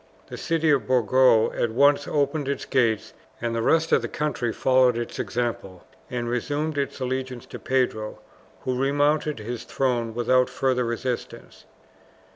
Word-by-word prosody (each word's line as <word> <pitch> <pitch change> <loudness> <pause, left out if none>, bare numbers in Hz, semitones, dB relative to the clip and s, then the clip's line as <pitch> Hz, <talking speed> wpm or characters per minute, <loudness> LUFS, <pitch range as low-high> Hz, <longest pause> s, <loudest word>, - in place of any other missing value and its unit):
The - - -6
city 165 -1 +1
of 140 -3 +1
Burgos 125 -2 +4
at 120 - 0
once 140 +4 +3
opened 145 0 0
its 140 - -2
gates, 115 -5 +1 0.3
and 120 0 -2
the 115 - -1
rest 160 +6 +2
of - - +4
the - - -3
country 130 -6 -2
followed 130 0 +3
its 120 -1 -5
example, 120 -6 -3 0.2
and 120 -1 -3
resumed 145 +6 -2
its 140 -1 -2
allegiance 130 -1 -3
to - - -9
Pedro, 125 -5 -1 0.4
who 130 0 -2
remounted 145 +2 +1
his 115 +2 -6
throne 120 -4 -1
without 125 +1 +2
further 130 -2 0
resistance. 120 +1 -5
130 Hz, 150 wpm, -24 LUFS, 120-140 Hz, 0.4 s, Burgos